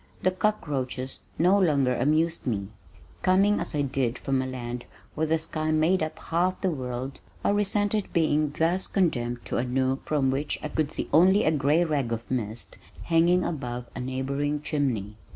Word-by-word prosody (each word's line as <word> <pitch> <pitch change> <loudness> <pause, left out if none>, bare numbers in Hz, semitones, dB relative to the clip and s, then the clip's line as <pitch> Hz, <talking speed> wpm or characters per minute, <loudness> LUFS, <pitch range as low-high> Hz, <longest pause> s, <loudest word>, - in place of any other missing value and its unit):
The 185 - +4
cockroaches 140 -10 -2 0.2
no 185 +5 +4
longer 140 -8 +3
amused 160 +4 +1
me. 100 -5 -1 0.5
Coming 195 +3 +4
as - - -2
I 145 - +1
did 130 -3 -1
from 135 -1 0
a 130 - -3
land 120 -1 -5 0.3
where 160 +1 -1
the 160 +1 +2
sky 155 0 -3
made 160 +4 +3
up 155 0 -3
half 180 +3 0
the 190 - +1
world 130 -2 -5 0.2
I - - +2
resented 205 0 +1
being 155 -2 +2
thus 170 +3 +1
condemned 120 - 0
to - - -2
a 120 - +1
nook 130 +1 -1
from 140 -3 +2
which 140 +3 -1
I 150 - -3
could 155 -1 -1
see - - -3
only 190 +6 +6
a 155 - +3
gray 150 +3 +3
rag 145 -7 -1
of 115 +1 -4
mist 115 -2 -3 0.2
hanging 170 +2 +3
above 125 -6 -3
a - - -4
neighboring 140 +3 -2
chimney. 120 -10 -1
150 Hz, 175 wpm, -27 LUFS, 130-170 Hz, 0.5 s, only